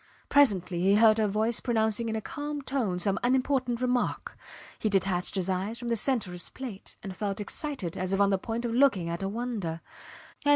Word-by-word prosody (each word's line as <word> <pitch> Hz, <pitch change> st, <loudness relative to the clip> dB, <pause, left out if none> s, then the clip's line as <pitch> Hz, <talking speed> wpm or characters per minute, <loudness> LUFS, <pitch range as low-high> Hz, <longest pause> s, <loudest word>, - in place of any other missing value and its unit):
Presently 190 Hz, -11 st, +3 dB
he 195 Hz, +2 st, +4 dB
heard 220 Hz, 0 st, +6 dB
her 215 Hz, -, +3 dB
voice 215 Hz, +3 st, +1 dB
pronouncing 225 Hz, -1 st, +1 dB
in 220 Hz, -, -2 dB
a 220 Hz, -, -2 dB
calm 290 Hz, +3 st, -5 dB
tone 250 Hz, -9 st, -1 dB
some 190 Hz, +2 st, 0 dB
unimportant 255 Hz, -1 st, +1 dB
remark. 250 Hz, -1 st, -1 dB, 0.4 s
He 215 Hz, -, 0 dB
detached 190 Hz, -2 st, 0 dB
his 190 Hz, -2 st, 0 dB
eyes 190 Hz, +4 st, -2 dB
from 240 Hz, -1 st, -5 dB
the 230 Hz, -, +2 dB
centre 230 Hz, -4 st, +1 dB
of -, -, -8 dB
his 175 Hz, -, -5 dB
plate 240 Hz, -7 st, -7 dB
and 195 Hz, -2 st, -6 dB
felt 205 Hz, 0 st, -3 dB
excited 215 Hz, -, -3 dB
as 185 Hz, 0 st, -2 dB
if 195 Hz, -, +1 dB
on 200 Hz, 0 st, +4 dB
the 195 Hz, -, +2 dB
point 230 Hz, +3 st, -3 dB
of 230 Hz, -, -2 dB
looking 235 Hz, -10 st, +3 dB
at 170 Hz, +2 st, -3 dB
a 195 Hz, -, -1 dB
wonder. 210 Hz, -7 st, -3 dB
215 Hz, 205 wpm, -28 LUFS, 190-245 Hz, 0.4 s, heard